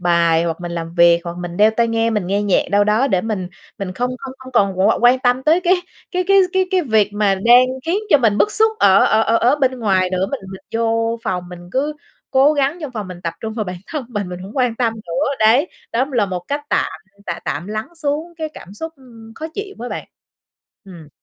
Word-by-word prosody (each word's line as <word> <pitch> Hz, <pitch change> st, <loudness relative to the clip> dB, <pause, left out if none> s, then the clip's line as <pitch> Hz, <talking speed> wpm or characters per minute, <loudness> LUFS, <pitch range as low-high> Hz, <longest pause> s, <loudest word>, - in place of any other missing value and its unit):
bài 170 Hz, -1 st, +3 dB
hoặc 165 Hz, 0 st, -3 dB
mình 175 Hz, -1 st, -5 dB
làm 165 Hz, 0 st, -5 dB
việc, 170 Hz, -1 st, +5 dB
hoặc 170 Hz, 0 st, -5 dB
mình 175 Hz, -1 st, -6 dB
đeo 215 Hz, +1 st, +5 dB
tai 230 Hz, +1 st, +1 dB
nghe, 230 Hz, 0 st, +1 dB
mình 210 Hz, -5 st, -1 dB
nghe 200 Hz, +2 st, 0 dB
nhạc 200 Hz, -3 st, +2 dB
đâu 205 Hz, +1 st, +4 dB
đó 215 Hz, +6 st, +2 dB
để 185 Hz, -, +2 dB
mình 200 Hz, -4 st, -3 dB, 0.3 s
mình 195 Hz, -2 st, -4 dB
không 245 Hz, +6 st, -2 dB
không 270 Hz, -1 st, -8 dB
không 260 Hz, -1 st, -12 dB
còn 195 Hz, -5 st, +2 dB
qu 200 Hz, +4 st, +3 dB
quan 245 Hz, +2 st, +5 dB
tâm 250 Hz, 0 st, +1 dB
tới 315 Hz, +5 st, +3 dB
cái 360 Hz, +1 st, +3 dB, 0.4 s
cái 365 Hz, 0 st, -1 dB
cái 395 Hz, +1 st, +5 dB
cái 375 Hz, 0 st, +2 dB
cái 375 Hz, -2 st, +2 dB
việc 220 Hz, -7 st, +2 dB
mà 205 Hz, -2 st, +2 dB
đang 240 Hz, +6 st, +6 dB, 0.2 s
khiến 355 Hz, +4 st, +1 dB
cho 295 Hz, -, +6 dB
mình 215 Hz, -4 st, +2 dB
bức 420 Hz, -, +2 dB
xúc 440 Hz, 0 st, +3 dB
ở 195 Hz, 0 st, +5 dB
ở 220 Hz, +1 st, +3 dB
ở 230 Hz, +1 st, +2 dB
ở 250 Hz, +6 st, +3 dB
bên 260 Hz, -3 st, 0 dB
ngoài 190 Hz, -4 st, +1 dB
nữa. 185 Hz, +1 st, 0 dB
Mình 275 Hz, -, -3 dB
mình 190 Hz, -, -9 dB
vô 230 Hz, 0 st, 0 dB
phòng 180 Hz, -3 st, -3 dB
mình 175 Hz, 0 st, -11 dB
cứ 285 Hz, +3 st, 0 dB, 0.4 s
cố 275 Hz, +3 st, +5 dB
gắng 285 Hz, +3 st, 0 dB
trong 295 Hz, -4 st, -5 dB
phòng 210 Hz, -5 st, -5 dB
mình 180 Hz, -1 st, -9 dB
tập 165 Hz, -2 st, -3 dB
trung 220 Hz, -1 st, -4 dB
vào 220 Hz, -1 st, -3 dB
bản 180 Hz, -1 st, -5 dB
thân 300 Hz, -4 st, -4 dB
mình, 205 Hz, -5 st, -4 dB
mình 180 Hz, 0 st, -6 dB
hổng 195 Hz, +7 st, -10 dB
quan 250 Hz, -3 st, +1 dB
tâm 230 Hz, -2 st, +1 dB
nữa, 210 Hz, +3 st, -2 dB
đấy. 240 Hz, +10 st, +4 dB, 0.2 s
Đó 240 Hz, +3 st, +2 dB
cũng 275 Hz, -, -12 dB
là 225 Hz, -5 st, +2 dB
một 185 Hz, -2 st, -3 dB
cách 285 Hz, +1 st, -1 dB
tạm -, -, +1 dB, 0.4 s
tạm 170 Hz, -, -3 dB
tạm 155 Hz, +5 st, -3 dB
lắng 215 Hz, +1 st, -4 dB
xuống 320 Hz, +2 st, -3 dB
cái 315 Hz, -1 st, -4 dB
cảm 190 Hz, +4 st, -11 dB
xúc 320 Hz, +8 st, -6 dB, 0.4 s
khó 315 Hz, -, -6 dB
chịu 405 Hz, -1 st, -6 dB
đó 245 Hz, -, -5 dB
bạn. -, -, -6 dB, 0.8 s
Ừm. 170 Hz, -6 st, -12 dB
220 Hz, 245 wpm, -19 LUFS, 185-265 Hz, 0.8 s, đang